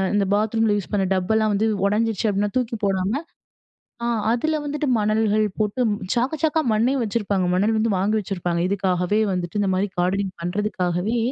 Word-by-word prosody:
இந்த 200 - +2
பாத்ரூம்ல 220 +1 +2
யூஸ் 200 - -6
பண்ண 195 -2 +2
டப்பெல்லாம் 215 +3 +1
வந்து 215 +2 +1 0.2
உடைஞ்சிடுச்சு 220 +1 0
அப்படின்னா 205 +1 0
தூக்கி 245 -2 -1
போடாம, 195 +1 0 0.9
அ - - 0 0.3
அதுல 310 +7 0
வந்துட்டு 295 +1 -2
மணல்கள் 215 0 +2 0.2
போட்டு 210 +4 0 0.4
சாக்கு, 255 +6 +1
சாக்கா 315 0 +2
மண்ணையும் 250 +4 +1
வச்சிருப்பாங்க. 200 -3 -1
மணல் 210 +4 +2
வந்து 225 +1 +1
வாங்கி 205 +3 +1
வச்சிருப்பாங்க, 175 -3 -2
இதுக்காகவே 190 +1 0
வந்துட்டு 180 +1 -3
இந்த 195 - +1
மாரி 195 +2 0
கார்டனிங் 190 +2 0
பண்ணுறதுக்காகவே, 185 +2 -1
210 Hz, 155 wpm, -22 LUFS, 190-225 Hz, 0.9 s, இந்த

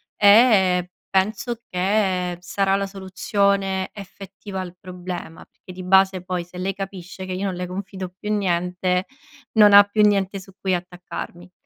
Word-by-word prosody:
e 200 -4 +5 0.2
penso 215 +5 0
che 185 -1 0
sarà 195 +2 0
la 200 0 0
soluzione 195 0 -1
effettiva 195 0 -9
al 180 -1 -6
problema 180 -2 -7
perché - - -15
di 185 +1 -8
base 190 0 +4
poi 180 -1 -3
se 180 +1 -13
lei 190 +2 -1
capisce 190 -1 -7
che 185 - -5
io 190 +2 -3
non 190 -2 -2
le 180 +1 -4
confido 190 0 -6
più 210 - -4
niente, 180 -1 0 0.5
non 210 -2 +6
ha 200 0 +11
più 205 +1 +1
niente 195 -1 +1
su 190 +1 -14
cui 190 -1 +1
attaccarmi. 180 0 -8
190 Hz, 155 wpm, -22 LUFS, 180-200 Hz, 0.5 s, ha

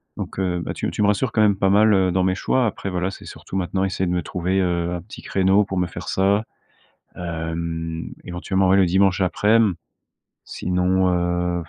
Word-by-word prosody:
donc - - -6
heu, 90 -2 0
bah, - - -3
tu - - -5
m - - -3
tu 105 - -1
me 100 - +4
rassures 110 +4 +1
quand 110 - +2
même 105 -2 +4
pas 95 0 +1
mal, 105 +2 +5
heu, 95 -2 +3
dans 95 +1 +1
mes 95 0 +2
choix. 130 +6 +1
Après, 100 -2 -3
voilà, 90 +1 -2
c'est - - -11
surtout, - - -9
maintenant, 95 0 -1
essayer 95 -1 -1
de - - -1
me 90 -2 -1
trouver, 90 +3 -1
heu, 85 -1 0
un 85 - -5
petit 105 - -11
créneau 95 +2 +2
pour 95 -1 -5
me 90 - +2
faire 85 - -8
ça. 100 +2 +2 0.7
Hem, 80 -1 -4
éventuellement, 95 +2 -1
ouais, 95 - +5
le 95 - +5
dimanche 95 +1 +2
aprèm. 105 +2 +3 0.7
Sinon, 90 +1 0
heu, 90 0 0
95 Hz, 210 wpm, -22 LUFS, 90-95 Hz, 0.7 s, mal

